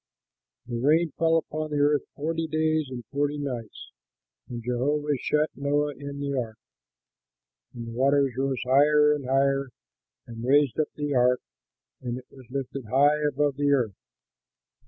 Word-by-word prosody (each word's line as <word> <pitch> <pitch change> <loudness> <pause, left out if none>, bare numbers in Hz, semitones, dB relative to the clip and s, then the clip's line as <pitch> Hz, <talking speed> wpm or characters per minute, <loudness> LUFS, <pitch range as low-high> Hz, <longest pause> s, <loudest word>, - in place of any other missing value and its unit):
The 120 -1 -4
rain 155 +5 +3
fell 165 0 +4
upon 155 -1 -3
the 150 - -2
earth 145 0 +3
forty 165 +2 -2
days 155 -1 0
and 120 -3 -7
forty 145 +1 0
nights, 125 -7 -6 0.6
and 120 -1 -6
Jehovah 145 +5 0
shut 150 +4 +1
Noah 145 +1 0
in 140 +1 -7
the 140 0 -2
ark. 115 -4 -3 1.2
And 120 -1 -6
the - - -7
waters 135 +2 +2
rose 135 -1 -1
higher 150 +3 +5
and 145 -3 -4
higher 135 0 +2 0.6
and 115 0 -8
raised 140 +2 +3
up 155 - +2
the 145 -1 -2
ark, 125 0 +3 0.6
and 120 0 -4
it 130 - -10
was 130 -3 -15
lifted 135 -1 -5
high 140 +6 +4
above 145 -1 0
the 145 0 +1
earth. 120 -7 +1
140 Hz, 155 wpm, -26 LUFS, 125-150 Hz, 1.2 s, higher